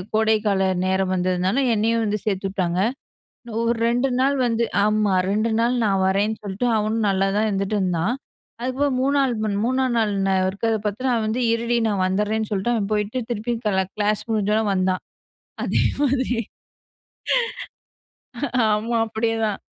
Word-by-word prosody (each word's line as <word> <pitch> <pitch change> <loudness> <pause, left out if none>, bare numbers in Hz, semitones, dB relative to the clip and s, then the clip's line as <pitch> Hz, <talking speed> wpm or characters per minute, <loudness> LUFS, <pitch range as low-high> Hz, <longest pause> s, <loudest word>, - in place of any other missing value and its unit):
கோடைக்கால 215 -3 +2 0.2
நேரம் 190 0 +1
வந்ததால, 185 +3 0 0.2
என்னையும் 225 +2 +1
வந்து 210 0 -1
சேர்த்தூட்டாங்க. 190 -3 -1 0.8
ஒரு 230 0 +1
2 245 +3 +1
நாள் 275 +2 +2
வந்து 235 0 +1 0.2
ஆமா 210 -2 +2 0.2
2 215 +3 +1
நாள் 235 +2 +2
நான் 195 -2 +2
வரேன்னு 205 +3 +1
சொல்ட்டு 200 +4 -2
அவனும் 215 +1 0
நல்லாதான் 195 +2 +1
இருந்துட்டுந்தான். 195 0 0 0.5
அதுக்கப்புறம் 260 +2 0
மூணால் 275 -1 +2 0.3
3ஆம் 260 0 +1
நாள் 215 -2 +1 0.4
இருக்கறத 220 +4 0
பார்த்து, 210 +5 -3
அவன் 230 -2 0
வந்து 230 +4 -1
இருடி 235 +1 0
நான் 200 -3 0
வந்துறேன்னு 210 +3 -1
சொல்ட்டு, 205 +4 0
அவன் 210 -3 -1
போயிட்டு 210 +3 -1
திருப்பி 235 +1 -2
க்ளா 190 -3 +1
கிளாஸ் 210 0 +1
முடிஞ்சோன 215 0 +1
வந்தான். 185 0 0 0.6
அதே - - +1 0.2
மாதிரி. 260 -3 +1 2.4
ஆமா 225 +3 0
அப்டியேதான். 220 -1 -1
215 Hz, 130 wpm, -22 LUFS, 195-230 Hz, 2.4 s, கோடைக்கால